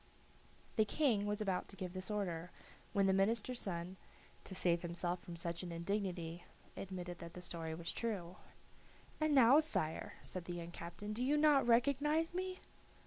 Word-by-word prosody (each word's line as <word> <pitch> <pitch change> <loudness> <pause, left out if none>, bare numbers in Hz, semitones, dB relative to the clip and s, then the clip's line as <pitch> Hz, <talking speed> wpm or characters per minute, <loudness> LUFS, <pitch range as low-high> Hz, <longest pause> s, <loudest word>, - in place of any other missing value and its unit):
The 220 - +6
King 215 -3 +2
was 210 +1 -1
about 190 -3 0
to 195 - -10
give 180 -2 -5
this 185 +1 -4
order, 180 -5 -2 0.4
when 200 -2 +3
the 190 - +4
minister's 225 +5 +1
son, 180 0 -4 0.5
to 190 - -5
save 170 -2 +2
himself 175 +1 -2
from 175 - -8
such 170 0 -2
an 180 -2 -5
indignity, 175 -1 -2 0.3
admitted 180 -2 -5
that 170 0 -8
the - - -6
story 165 -2 -4
was 170 +1 -4
true. 185 -6 -3 0.8
"And 310 -1 +3
now, 265 +2 +8
sire," 160 - -1
said 185 -2 -4
the 175 - -4
young 170 0 -6
captain, 175 +5 -6
"do 235 +3 0
you 290 +3 +3
not 295 -4 +5
recognize 285 +7 +3
me?" 370 +1 -3
190 Hz, 170 wpm, -37 LUFS, 175-235 Hz, 0.8 s, now